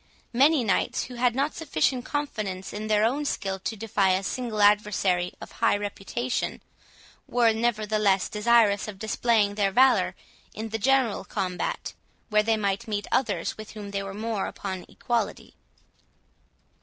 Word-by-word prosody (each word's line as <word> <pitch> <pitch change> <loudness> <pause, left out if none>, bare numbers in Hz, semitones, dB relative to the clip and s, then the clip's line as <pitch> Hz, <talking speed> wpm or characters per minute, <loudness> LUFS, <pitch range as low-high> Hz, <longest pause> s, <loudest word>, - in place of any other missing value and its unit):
Many 275 +3 +4
knights, 205 - +1
who 250 - -8
had 245 0 +1
not 280 +3 0
sufficient 255 - 0
confidence 215 -10 -3
in 215 +1 -4
their 215 -1 +3
own 275 +6 0
skill 195 -8 -2
to 220 - -4
defy 200 -3 +1
a 190 +1 0
single 230 +1 -3
adversary 205 -4 +3
of - - -10
high - - +2
reputation, 205 +5 -3 0.7
were, 235 -2 +3
nevertheless, 215 -4 +1
desirous 210 -2 +3
of 210 -2 -7
displaying 220 0 +1
their 200 -1 +1
valour 260 +6 +4 0.4
in 220 +1 -5
the 225 +1 -3
general 260 -3 +2
combat, 185 -2 -3 0.4
where 210 0 +5
they 220 +1 +1
might 200 -1 -1
meet 205 -2 -2
others 205 -10 0
with 215 - -9
whom 205 -2 -7
they 200 0 -2
were 195 0 -6
more 215 -2 -2
upon 190 -2 -5
an - - -12
equality. 235 -4 -3
215 Hz, 155 wpm, -26 LUFS, 200-235 Hz, 0.7 s, where